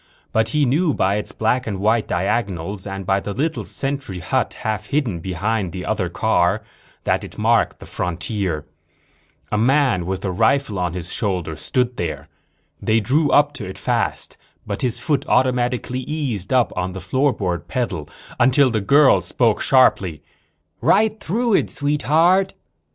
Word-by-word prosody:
But 110 Hz, 0 st, +2 dB
he 145 Hz, +4 st, +2 dB
knew 150 Hz, +5 st, +2 dB
by 95 Hz, +2 st, +1 dB
its 105 Hz, -, -3 dB
black 125 Hz, +3 st, 0 dB
and 100 Hz, -3 st, -3 dB
white 110 Hz, +2 st, +2 dB
diagonals 95 Hz, 0 st, -2 dB
and 95 Hz, -1 st, -5 dB
by 95 Hz, +1 st, +2 dB
the 100 Hz, +1 st, -5 dB
little 155 Hz, +8 st, -2 dB
sentry 135 Hz, -8 st, -3 dB
hut 90 Hz, -, -1 dB
half 110 Hz, -1 st, -2 dB
hidden 130 Hz, -, -1 dB
behind 95 Hz, +2 st, -2 dB
the 90 Hz, -1 st, -5 dB
other -, -, -1 dB
car 95 Hz, +5 st, +1 dB, 0.4 s
that -, -, 0 dB
it -, -, -10 dB
marked -, -, +2 dB
the -, -, -12 dB
frontier. 90 Hz, -2 st, -3 dB, 0.9 s
A 105 Hz, -, +1 dB
man 125 Hz, -, +2 dB
with 95 Hz, +1 st, -3 dB
a 95 Hz, -, 0 dB
rifle 110 Hz, +1 st, +1 dB
on 90 Hz, -2 st, -1 dB
his 90 Hz, -3 st, -4 dB
shoulder 90 Hz, -7 st, -1 dB
stood 125 Hz, -, -1 dB
there. 75 Hz, -3 st, -4 dB, 0.5 s
They 110 Hz, +1 st, +2 dB
drew 140 Hz, +8 st, +2 dB
up 145 Hz, 0 st, +4 dB
to 120 Hz, -8 st, -6 dB
it 95 Hz, -, -8 dB
fast, -, -, -2 dB, 0.3 s
but -, -, -4 dB
his 125 Hz, -2 st, 0 dB
foot 150 Hz, -4 st, 0 dB
automatically 125 Hz, 0 st, +1 dB
eased 130 Hz, -, -3 dB
up 125 Hz, -2 st, +2 dB
on 90 Hz, 0 st, -2 dB
the 95 Hz, -, -6 dB
floorboard 95 Hz, -, -1 dB
pedal 95 Hz, -, -3 dB, 0.3 s
until 130 Hz, +2 st, +4 dB
the 110 Hz, -2 st, 0 dB
girl 135 Hz, -2 st, +5 dB
spoke 110 Hz, +5 st, +1 dB
sharply. 95 Hz, -, +3 dB, 0.6 s
"Right 215 Hz, -, +3 dB
through 230 Hz, +6 st, 0 dB
it, -, -, +2 dB
Sweetheart." 160 Hz, +6 st, +2 dB
110 Hz, 160 wpm, -21 LUFS, 95-135 Hz, 0.9 s, girl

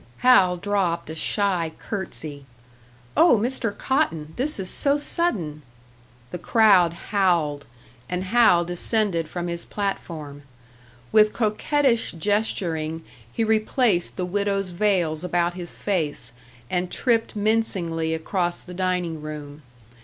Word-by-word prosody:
Hal 185 Hz, -8 st, +6 dB
dropped 180 Hz, -4 st, -1 dB
a -, -, -6 dB
shy 180 Hz, -2 st, 0 dB
curtsey. 155 Hz, -8 st, -6 dB, 0.7 s
"Oh, 330 Hz, -8 st, +6 dB
Mr. 230 Hz, -1 st, -1 dB
Cotton! 165 Hz, -, -1 dB
This 280 Hz, -1 st, -2 dB
is 190 Hz, -, -3 dB
so 280 Hz, +8 st, +1 dB
sudden!" 210 Hz, -, -2 dB, 0.7 s
The 180 Hz, -, -5 dB
crowd 200 Hz, -7 st, +4 dB, 0.2 s
howled; 170 Hz, -8 st, +1 dB, 0.4 s
and 180 Hz, +1 st, -2 dB
Hal 190 Hz, -4 st, +4 dB
descended 175 Hz, -1 st, 0 dB
from 175 Hz, +1 st, -4 dB
his 170 Hz, 0 st, -4 dB
platform. 160 Hz, -8 st, -5 dB, 0.7 s
With 215 Hz, -1 st, +5 dB
coquettish 235 Hz, +3 st, +1 dB
gesturing 165 Hz, -4 st, -1 dB, 0.3 s
he 225 Hz, -, -1 dB
replaced 215 Hz, -3 st, +1 dB
the 180 Hz, -, -1 dB
widow's 195 Hz, 0 st, -1 dB
veils 175 Hz, -4 st, 0 dB
about 175 Hz, -1 st, 0 dB
his 175 Hz, -1 st, -6 dB
face, 170 Hz, -8 st, -2 dB, 0.4 s
and 180 Hz, +5 st, -1 dB
tripped 230 Hz, -3 st, +1 dB
mincingly 185 Hz, -7 st, 0 dB
across 175 Hz, +1 st, -2 dB
the 180 Hz, -, -11 dB
dining 180 Hz, -3 st, -1 dB
room. 150 Hz, -1 st, -8 dB
180 Hz, 115 wpm, -24 LUFS, 165-215 Hz, 0.7 s, Hal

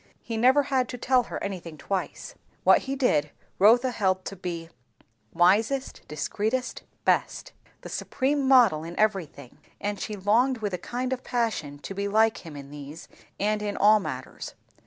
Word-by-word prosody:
He 230 Hz, -, -5 dB
never 260 Hz, +6 st, +4 dB
had 260 Hz, -3 st, 0 dB
to 250 Hz, -, -5 dB
tell 255 Hz, +1 st, +3 dB
her -, -, -5 dB
anything 175 Hz, -5 st, -6 dB
twice. 190 Hz, +6 st, -4 dB, 0.3 s
What -, -, +6 dB
he 275 Hz, -, 0 dB
did, 155 Hz, -, +2 dB, 0.3 s
Rotha 240 Hz, +5 st, +5 dB
held 190 Hz, -5 st, 0 dB
to 195 Hz, -, -5 dB
be 170 Hz, -3 st, -5 dB, 0.6 s
"wisest, 220 Hz, +10 st, +2 dB
discreetest, 220 Hz, +11 st, -2 dB, 0.2 s
best," -, -, 0 dB, 0.3 s
the -, -, -9 dB
supreme 275 Hz, +1 st, -1 dB
model 235 Hz, -, +5 dB
in 170 Hz, +1 st, -8 dB
everything; 185 Hz, -, -1 dB, 0.2 s
and 205 Hz, -1 st, -3 dB
she 215 Hz, -, -4 dB
longed 230 Hz, +7 st, +2 dB
with 210 Hz, -3 st, -3 dB
a 180 Hz, -, -2 dB
kind 255 Hz, +1 st, -3 dB
of 255 Hz, -, -5 dB
passion 220 Hz, -, -2 dB
to 145 Hz, -, -8 dB
be 200 Hz, +1 st, -2 dB
like 220 Hz, +2 st, +3 dB
him 160 Hz, -4 st, -10 dB
in 140 Hz, 0 st, -10 dB
these, 145 Hz, +2 st, -9 dB, 0.3 s
and 210 Hz, +1 st, 0 dB
in 205 Hz, -1 st, -3 dB
all 210 Hz, +1 st, +6 dB
matters. 130 Hz, -9 st, -7 dB
205 Hz, 165 wpm, -26 LUFS, 175-245 Hz, 0.6 s, What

